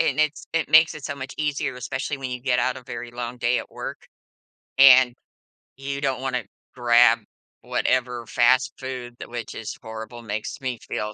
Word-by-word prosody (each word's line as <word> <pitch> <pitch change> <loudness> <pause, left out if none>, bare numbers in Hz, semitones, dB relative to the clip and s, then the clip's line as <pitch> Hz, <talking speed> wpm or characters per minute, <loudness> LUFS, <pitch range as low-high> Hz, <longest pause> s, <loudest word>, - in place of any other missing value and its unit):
and 140 - +1
it's 155 -1 0
it 165 0 0
makes 160 +1 +6
it 150 - -10
so 140 - -3
much 130 -1 -7
easier, 145 -2 -1
especially 135 +3 -3
when 135 -1 -4
you 125 0 -4
get 125 -1 +1
out 125 +1 +1
a 130 - -9
very 120 -2 -7
long 120 0 -5
day 120 +1 +2
at - - -12
work. - - -6 0.8
And 130 -2 +8 0.6
you 140 +1 -4
don't 135 -2 -1
wanna 130 -1 -1 0.3
grab 120 -1 +5 0.4
whatever 125 -2 0
fast 130 +2 +3
food 130 -3 -6
tha - - -8
which 120 -2 -6
is 110 - -6
horrible, 110 +1 -8
makes 110 +2 -5
me 130 -2 -2
feel 105 0 -3
130 Hz, 185 wpm, -24 LUFS, 120-135 Hz, 0.8 s, And